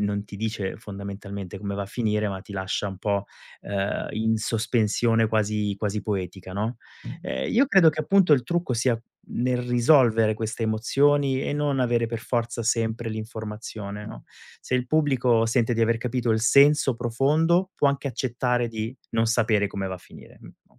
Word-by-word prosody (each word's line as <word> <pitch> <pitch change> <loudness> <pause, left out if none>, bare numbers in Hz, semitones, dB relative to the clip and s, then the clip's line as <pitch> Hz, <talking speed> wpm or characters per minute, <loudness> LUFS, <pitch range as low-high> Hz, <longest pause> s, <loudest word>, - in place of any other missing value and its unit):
non 100 0 -1
ti 100 - -10
dice 105 -2 -3
fondamentalmente 100 -2 -7
come 100 0 -4
va 100 - -2
a - - -6
finire, 105 -1 -1
ma 95 -1 -5
ti 100 - -12
lascia 95 +1 -2
un 95 -1 -8
po', 100 0 -1 0.3
ehm, 100 0 -2
in 110 +1 +1
sospensione 115 0 +1
quasi 105 -2 0
quasi 105 0 -2
poetica, 95 -2 -4
no, 110 +4 -3 0.4
ehm, 65 0 -3
io 270 +4 +4
credo 190 -8 +6
che 155 - -4
appunto 185 +1 +4
il 130 -4 +4
trucco 170 0 -1
sia 120 0 +1 0.3
nel 125 +1 -1
risolvere 120 -3 +4
queste 110 +1 -3
emozioni 135 +5 +2
e - - -2
non 145 -2 0
avere 120 -2 +1
per 115 0 -4
forza 120 -1 -2
sempre 115 0 0
l'informazione, 110 -1 -6
no, - - -10 0.4
se - - -3
il 125 0 0
pubblico 130 -6 +2
sente 120 0 +1
di 115 - -1
aver 115 0 +2
capito 125 0 -1
il 110 0 +2
senso 140 +1 +5
profondo 155 +10 +2
può - - +3
anche 140 0 -1
accettare 125 0 -1
di 110 +2 -4 0.2
non 115 0 +1
sapere 110 -2 +2
come 100 -1 -4
va 95 - -4
a 90 - -9
finire. - - -15
Mh - - -18
115 Hz, 175 wpm, -25 LUFS, 105-125 Hz, 0.4 s, credo